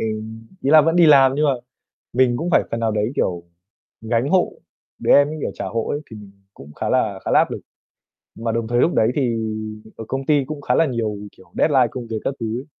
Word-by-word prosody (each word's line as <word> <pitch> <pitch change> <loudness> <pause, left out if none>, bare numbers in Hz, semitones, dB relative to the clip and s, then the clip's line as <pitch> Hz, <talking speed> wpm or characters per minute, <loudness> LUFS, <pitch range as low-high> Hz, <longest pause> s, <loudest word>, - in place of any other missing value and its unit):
ừm, 110 +1 -5 0.2
ý 140 - +1
là 155 0 +8
vẫn 165 +3 +1
đi 170 -2 +6
làm 135 -3 +6
nhưng 150 +1 +1
mà 140 - +3 0.6
mình 125 -1 +2
cũng 170 +5 -3
phải - - +4
phần 115 - -3
nào 115 -1 +1
đấy, 105 +4 -1
kiểu, 85 -2 -1 0.6
gánh 115 +4 -1
hộ, 185 +1 +2 0.5
đứa - - +2
em 145 0 +6
ấy, 155 - -5
kiểu, - - -2
trả - - -5
hộ 115 -1 -3
ấy 145 - -2
thì 110 - -9
mình 105 -2 -12 0.2
cũng 75 +2 -13
khá - - -4
là 105 -6 0
khá - - -3
là - - +5
áp - - +2
lực. - - -5 0.7
Mà 115 0 -3
đồng 115 -1 -2
thời 120 0 0
lúc 170 - +2
đấy 110 +2 +3
thì 125 -5 0 0.6
ở 110 - -7
công 135 0 -3
ty 145 -3 +3
cũng 150 +1 -7
khá 125 -2 0
là 165 - +3
nhiều, 115 -5 -2 0.2
kiểu, 90 -2 -21
deadline 135 -5 +4
công 125 -2 -7
việc 110 -1 -4
các 135 - -1
thứ 115 +1 -3
ấy, 135 - -9
120 Hz, 250 wpm, -21 LUFS, 110-145 Hz, 0.7 s, là